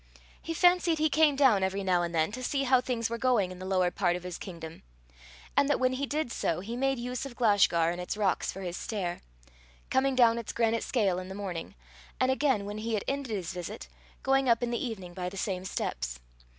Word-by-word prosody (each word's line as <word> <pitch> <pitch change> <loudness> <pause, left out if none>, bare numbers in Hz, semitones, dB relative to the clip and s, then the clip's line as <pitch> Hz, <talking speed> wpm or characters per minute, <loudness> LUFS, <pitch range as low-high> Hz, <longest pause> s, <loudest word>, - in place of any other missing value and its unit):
He 330 - -4
fancied 355 -1 +4
he 310 -1 +2
came 305 -1 +4
down 265 -8 +5
every 190 +1 -1
now 180 -2 +2
and 170 -1 -2
then 160 +3 +2
to 255 +4 -6
see 275 +2 0
how 255 -1 +4
things 240 -3 -1
were 235 0 -4
going 230 -8 +2
in 180 - -9
the 185 - -6
lower 185 -2 +2
part 175 -2 +1
of 180 - -6
his 180 -1 -6
kingdom; 165 -3 -8 0.7
and 280 0 +4
that 290 - +2
when 255 0 +2
he 275 +2 -2
did 295 -3 -2
so, 165 -6 -1
he 220 +6 -5
made 270 +1 +1
use 250 +1 -4
of 275 -3 -7
Glashgar 200 -8 +3
and 175 +1 -4
its 180 - -4
rocks 200 -3 +1
for 195 - -8
his 175 -2 -4
stair, 185 -6 -3 0.7
coming 265 0 +2
down 235 -2 +5
its 230 - -6
granite 230 -1 +1
scale 200 -7 +1
in 185 - -7
the 190 - -7
morning, 190 -5 -5 0.4
and 255 - +3
again, 265 -6 +1
when 205 +1 -5
he 225 +1 -1
had 205 - -2
ended 275 -1 -2
his 180 -5 -4
visit, 180 -1 -7 0.3
going 270 -1 +3
up 235 +1 +3
in 240 - -1
the 235 - -1
evening 195 -8 -5
by 180 0 -3
the 195 - -10
same 185 -1 -2
steps. - - -3
220 Hz, 230 wpm, -29 LUFS, 185-260 Hz, 0.7 s, down